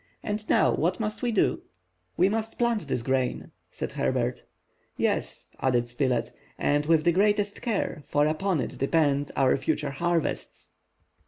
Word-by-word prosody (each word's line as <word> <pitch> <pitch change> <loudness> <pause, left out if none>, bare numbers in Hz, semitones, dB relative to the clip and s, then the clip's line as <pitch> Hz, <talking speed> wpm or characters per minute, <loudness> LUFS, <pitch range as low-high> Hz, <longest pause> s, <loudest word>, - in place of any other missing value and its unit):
And 210 +1 -3
now - - +4
what 175 +4 0
must 215 -1 -3
we 245 - 0
do?" 215 - +1 0.6
"We 180 - +5
must 220 +2 -2
plant 235 -3 0
this 115 - -1
grain," 130 0 -1 0.2
said - - -5
Herbert. - - -1 0.5
"Yes," - - -1
added 120 -2 +1
Spilett, 120 -1 0 0.3
"and 145 +1 +1
with 160 -1 +4
the 170 - +4
greatest 205 +2 +1
care, 215 - -2
for 145 0 +2
upon 155 +1 0
it - - -5
depend 145 -1 +2
our 135 -2 +4
future 150 +1 -1
harvests!" 170 +3 -2
160 Hz, 150 wpm, -27 LUFS, 135-205 Hz, 0.6 s, We